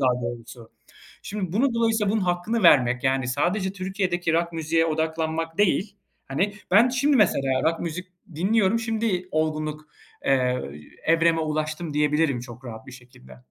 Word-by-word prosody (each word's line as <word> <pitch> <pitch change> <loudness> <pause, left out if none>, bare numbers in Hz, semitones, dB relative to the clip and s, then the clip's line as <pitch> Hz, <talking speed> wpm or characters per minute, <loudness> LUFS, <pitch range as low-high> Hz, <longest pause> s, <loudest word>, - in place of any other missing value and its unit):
daha 125 -2 +1
doğrusu. 115 0 -7 0.5
Şimdi 200 -5 -4
bunu 235 +4 +1
dolayısıyla 225 -3 +1
bunun 220 - +1
hakkını 180 +5 -1
vermek, 125 -6 +5
yani, 130 -1 +1
sadece 185 +9 0
Türkiye'deki 185 -3 -2
rock 170 +1 0
müziğe 165 0 +1
odaklanmak 160 +1 -2
değil, 205 0 +1 0.3
hani, 190 +10 -1 0.2
ben 210 +6 +6
şimdi 270 +3 +2
mesela 135 - +2
rock 165 +1 +1
müzik 175 +2 -4 0.3
dinliyorum, 200 +5 +2
şimdi 220 -5 -1
olgunluk, 155 -1 -2 0.4
eee, 125 -2 +2 0.4
evreme 165 0 +3
ulaştım, 155 0 -3
diyebilirim 150 -3 +1
çok 120 +1 -11
rahat 110 -3 -9
bir 130 - -11
şekilde. 120 - -15
165 Hz, 140 wpm, -24 LUFS, 135-195 Hz, 0.5 s, ben